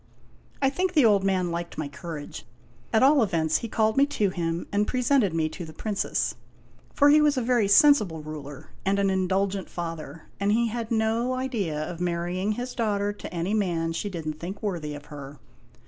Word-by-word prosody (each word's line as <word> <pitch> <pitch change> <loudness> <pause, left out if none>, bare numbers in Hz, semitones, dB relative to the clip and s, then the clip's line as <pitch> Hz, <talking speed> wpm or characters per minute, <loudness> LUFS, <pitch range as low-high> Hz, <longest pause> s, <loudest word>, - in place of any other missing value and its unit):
I 270 - +4
think 365 +5 -1
the 295 -6 +6
old 205 -3 +4
man 185 -3 +1
liked 170 0 -5
my 155 - -2
courage. 145 +1 -8 0.4
At 220 +2 +4
all 280 +1 +6
events, 160 -6 +1
he 230 - -5
called 220 +1 +1
me 280 +1 +5
to 210 -9 0
him, 170 -1 -2
and 205 +1 +1
presented 250 -5 +2
me 160 -1 0
to 175 - -7
the 155 -1 -9
Princess. 205 +4 -1 0.6
For 285 0 +4
he 305 +1 +6
was 295 -2 +3
a - - +2
very 235 -3 +2
sensible 200 - +5
ruler 145 -2 -9
and 195 +1 +1
an 200 -1 +2
indulgent 190 +1 0
father; 165 -3 -6 0.2
and 200 +1 +1
he 230 +1 +2
had 230 0 -4
no 230 +2 +1
idea 225 - -2
of 175 0 -7
marry 175 +1 -1
ing 210 +2 +1
his 245 +3 -5
daughter 205 -3 0
to - - -9
any 175 +3 -2
man 170 -6 0
she 165 +5 -3
did 165 -5 -6
n't 155 0 -4
think 190 +5 -7
worthy 165 -8 -3
of 145 0 -10
her. 140 0 -9
195 Hz, 200 wpm, -26 LUFS, 165-230 Hz, 0.6 s, the